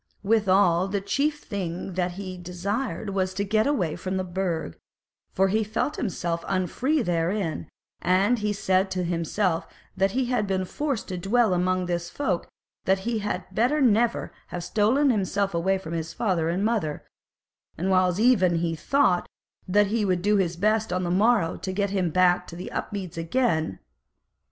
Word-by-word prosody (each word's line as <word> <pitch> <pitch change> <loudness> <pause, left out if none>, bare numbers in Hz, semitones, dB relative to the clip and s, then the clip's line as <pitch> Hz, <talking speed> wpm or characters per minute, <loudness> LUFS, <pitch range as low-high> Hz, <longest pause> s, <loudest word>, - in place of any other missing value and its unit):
Withal 195 -4 +3
the 200 +1 -1
chief 290 +9 -1
thing 185 -2 -4
that 180 0 -1
he 185 0 -6
desired 200 +6 -3
was 185 -1 -1
to 200 - 0
get 215 +3 +2
him 290 - +2
away 170 - -1
from 185 +1 -3
the 185 - -1
Burg, 175 - -3 0.5
for 195 +1 +2
he 220 +3 +2
felt 215 +7 -2
himself 170 -6 -2
unfree 245 - 0
therein; 175 0 -1 0.3
and 195 +7 +3
he 210 0 0
said 190 -1 +1
to 185 -1 -2
himself 170 +1 -1 0.3
that 195 +2 +1
if 260 -1 +1 0.2
he 190 - +1
were 185 - -2
forced 275 +4 -3
to 180 -1 -3
dwell 215 +2 +2
among 185 +1 +1
this 175 -1 -2
folk, 200 -12 -2 0.4
that 190 0 +2
he 230 +1 -1
had 200 -3 -3
better 250 +9 +2
never 235 -2 +2
have 175 -1 -5
stolen 230 +10 +3
himself 200 -2 0
away 190 +3 +1
from 170 -3 -7
his 165 0 -3
father 175 -7 0
and 185 +4 0
mother; 210 -10 -1 0.7
and 185 +4 0
whiles 185 0 +3
even 210 -7 +4
he 165 0 0
thought 185 - +2 0.4
that 205 +3 +4
he 230 -2 +1
would 185 -3 0
do 210 +1 +3
his 175 -3 0
best 215 +3 +1
on 185 +1 0
the 175 - -1
morrow 205 -2 +3
to 190 - -4
get 200 +1 -1
him 185 -3 +1
back 180 +1 +3
home 170 - -9
to 180 - -6
Upmeads 185 -5 -5
again. 165 - 0
190 Hz, 175 wpm, -25 LUFS, 175-215 Hz, 0.7 s, even